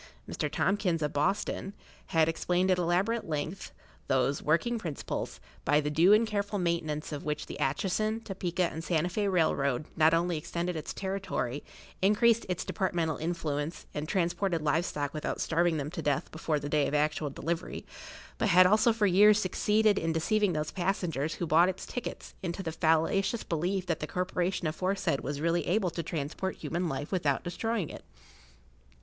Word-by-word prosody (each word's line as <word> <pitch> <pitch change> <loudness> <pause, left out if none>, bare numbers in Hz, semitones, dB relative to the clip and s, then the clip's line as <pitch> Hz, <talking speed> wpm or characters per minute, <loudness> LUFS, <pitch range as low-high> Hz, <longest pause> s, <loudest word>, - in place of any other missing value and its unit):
Mr. - - -3
Tompkins, 185 -5 +1
of 150 - -1
Boston, 195 +6 -1 0.3
had 160 -3 +3
explained 180 +3 +1
at 180 - +2
elaborate 180 +6 0
length 155 +5 -3 0.4
those 130 +1 +1
working 225 +10 +1
principles, 160 -9 -4 0.2
by 145 +2 +3
the 150 0 -1
due 170 +6 +5
and 215 +2 +6
careful 205 -1 -2
maintenance 165 -4 -1
of 145 -1 -5
which 150 0 -2
the - - -8
Atchison, 195 +10 0
Topeka, 185 -4 -2
and 165 -1 -2
Santa 165 0 +1
Fé 200 +2 0
Railroad 140 -6 +1
not 160 +1 +5
only 170 -1 0
extended 170 +3 -3
its 155 - -4
territory, 190 -9 -3 0.4
increased 225 +4 +4
its 180 -1 -2
departmental 170 -5 -1
influence, 160 -1 -3
and 150 +2 -4
transported 175 -2 0
live 155 +3 +2
stock 145 -4 -3
without 155 - -3
starving 170 0 +1
them 145 0 -3
to 170 - -4
death 145 -3 -1
before 160 -1 -1
the 145 - -5
day 150 -1 +2
of 150 - -1
actual 150 0 +1
delivery, 165 +5 -4 0.5
but, 220 - +2 0.2
also, 215 +5 +5
had 225 - -4
for 210 - +3
years 205 +2 +6
succeeded 210 +1 +2
in 165 0 -1
deceiving 200 +4 +1
those 150 -1 -2
passengers 175 -5 -1
who 175 - -3
bought 165 +3 +5
its 190 - -5
tickets 245 - -6
into 185 +1 -3
the 165 - -3
fallacious 165 +7 +1
belief 180 +3 -1
that 165 -3 -1
the 150 - -4
corporation 180 +1 -1
aforesaid 185 -1 0
was 145 0 -4
really 170 +2 0
able 185 -1 +1
to 170 - -3
transport 165 +4 -3
human 170 +3 -2
life 140 +1 -4
without 150 -8 +1
destroying 200 +1 -2
it. - - -10
170 Hz, 170 wpm, -30 LUFS, 155-190 Hz, 0.5 s, and